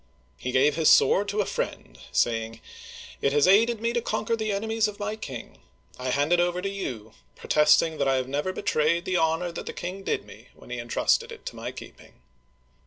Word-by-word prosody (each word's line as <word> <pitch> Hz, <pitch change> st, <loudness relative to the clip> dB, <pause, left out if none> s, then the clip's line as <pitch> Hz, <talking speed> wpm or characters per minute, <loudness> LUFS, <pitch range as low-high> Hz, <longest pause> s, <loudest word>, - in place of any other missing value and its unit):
He 125 Hz, -, -3 dB
gave 140 Hz, +4 st, +3 dB
his 160 Hz, -2 st, +4 dB
sword 205 Hz, +1 st, +5 dB
to 205 Hz, +1 st, 0 dB
a -, -, -1 dB
friend, -, -, -5 dB
saying: 115 Hz, -1 st, 0 dB, 0.6 s
It 140 Hz, -, +1 dB
has 145 Hz, +2 st, +4 dB
aided 225 Hz, +4 st, +4 dB
me 230 Hz, +1 st, -1 dB
to 240 Hz, -, 0 dB
conquer 230 Hz, 0 st, -1 dB
the 220 Hz, -1 st, -2 dB
enemies 220 Hz, +2 st, 0 dB
of 210 Hz, -1 st, -7 dB
my 210 Hz, +1 st, -3 dB
king.... 135 Hz, -, -8 dB, 0.4 s
I 130 Hz, 0 st, -3 dB
hand 145 Hz, +6 st, +1 dB
it 175 Hz, -, +4 dB
over 175 Hz, 0 st, +1 dB
to 195 Hz, +2 st, -2 dB
you, 120 Hz, -, -6 dB, 0.2 s
protesting 155 Hz, +1 st, +3 dB
that 140 Hz, -, +1 dB
I 135 Hz, -, +3 dB
have 130 Hz, -1 st, -1 dB
never 145 Hz, +7 st, -2 dB
betrayed 170 Hz, 0 st, 0 dB
the 185 Hz, -1 st, 0 dB
honor 165 Hz, +2 st, +1 dB
that -, -, -7 dB
the -, -, -4 dB
king 185 Hz, +3 st, -6 dB
did -, -, -2 dB
me -, -, -14 dB
when -, -, -15 dB
he 125 Hz, -, -3 dB
intrusted 120 Hz, 0 st, +1 dB
it -, -, -11 dB
to -, -, -6 dB
my -, -, -5 dB
keeping." -, -, -13 dB
170 Hz, 210 wpm, -26 LUFS, 135-200 Hz, 0.6 s, sword